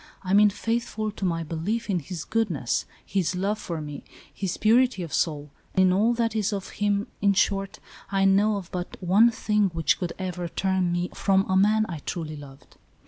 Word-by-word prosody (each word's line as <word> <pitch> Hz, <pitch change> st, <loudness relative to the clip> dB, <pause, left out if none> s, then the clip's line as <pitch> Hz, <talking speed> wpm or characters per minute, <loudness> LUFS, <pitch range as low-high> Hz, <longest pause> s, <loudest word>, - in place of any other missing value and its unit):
I 185 Hz, 0 st, -1 dB
mean 210 Hz, +1 st, +7 dB
faithful 220 Hz, 0 st, -2 dB
to 200 Hz, -, -5 dB
my 165 Hz, -2 st, 0 dB
belief 170 Hz, +9 st, -3 dB
in 190 Hz, -4 st, 0 dB
his 170 Hz, 0 st, -6 dB
goodness, 180 Hz, -, -1 dB, 0.2 s
his 190 Hz, -2 st, -1 dB
love 200 Hz, +4 st, -1 dB
for 170 Hz, -5 st, -4 dB
me, 150 Hz, -2 st, -7 dB, 0.3 s
his 190 Hz, -3 st, -3 dB
purity 230 Hz, -2 st, +3 dB
of 165 Hz, -, -7 dB
soul, 150 Hz, -4 st, -1 dB, 0.2 s
in 185 Hz, -1 st, +4 dB
all 220 Hz, +5 st, +3 dB
that 230 Hz, -1 st, 0 dB
is 215 Hz, -1 st, 0 dB
of 195 Hz, -2 st, -4 dB
him 205 Hz, 0 st, +1 dB
— -, -, -37 dB
in 200 Hz, -1 st, +4 dB
short, 195 Hz, 0 st, 0 dB, 0.3 s
I 195 Hz, 0 st, +2 dB
know 205 Hz, +2 st, +4 dB
of 195 Hz, -4 st, -6 dB
but 180 Hz, -1 st, -5 dB
one 195 Hz, +6 st, +5 dB
thing 210 Hz, -3 st, +1 dB
which 165 Hz, -2 st, +2 dB
could 175 Hz, -2 st, -3 dB
ever 180 Hz, -2 st, -4 dB
turn 185 Hz, 0 st, 0 dB
me 175 Hz, +1 st, -1 dB
from 195 Hz, -1 st, +2 dB
a 190 Hz, -, +1 dB
man 215 Hz, +3 st, +4 dB
I 165 Hz, -4 st, -5 dB
truly 155 Hz, +1 st, -5 dB
loved. 140 Hz, -2 st, -13 dB
195 Hz, 195 wpm, -25 LUFS, 175-210 Hz, 0.3 s, mean